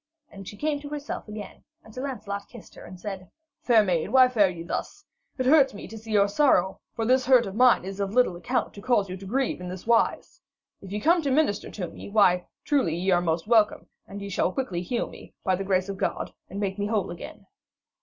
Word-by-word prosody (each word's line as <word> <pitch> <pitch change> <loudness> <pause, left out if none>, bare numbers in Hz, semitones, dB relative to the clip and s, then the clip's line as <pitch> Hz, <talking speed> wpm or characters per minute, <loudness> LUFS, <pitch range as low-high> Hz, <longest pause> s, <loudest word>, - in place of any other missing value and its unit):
And 195 -2 -11
she 205 - -9
came 295 +2 -1
to 290 0 -9
herself 295 -4 -5
again, 210 0 -9 0.2
and 220 - -15
Sir 255 - -6
Lancelot 210 -7 -5
kissed 235 -7 -13
her, - - -12
and 185 0 -11
said: 190 -2 -7 0.3
'Fair 230 -3 +5
maid, 180 -3 0
why 255 +1 +6
fare 210 -6 +3
ye 170 -2 -7
thus? 170 - -5 0.3
It 255 - -1
hurts 275 -3 +5
me - - -8
to 225 - -10
see 220 0 -9
your 205 -1 +4
sorrow, 200 -5 +2 0.2
for 225 - -1
this 255 +2 +2
hurt 255 -3 +6
of 195 - -6
mine 245 -3 +4
is 195 +1 -6
of 200 -1 -1
little 250 -8 +3
account 175 - -2
to 200 - -10
cause 205 -4 +1
you 185 - -5
to 195 - -11
grieve 255 -2 -1
in 180 - -6
this 180 0 -8
wise. 230 0 +1 0.4
If 195 - -10
ye 210 - -2
come 335 +9 +3
to 285 - -1
minister 270 -6 +1
to 185 -4 -5
me, - - -10
why, 200 -3 +5
ye - - -5
are 175 - -24 0.2
truly 190 - +1 0.3
welcome, 220 -2 +2 0.2
and 200 0 -8
ye 200 - -6
shall 185 - 0
quickly 185 -8 -3
heal 235 +7 -2
me, - - -14
by 190 -2 +2
the 195 - -4
grace 185 -1 +1
of 195 -1 -5
God, - - -2 0.2
and 195 - -6
make 200 -1 -2
me 205 - 0
whole 210 -4 -1
again.' 170 - -10
205 Hz, 235 wpm, -26 LUFS, 190-250 Hz, 0.4 s, why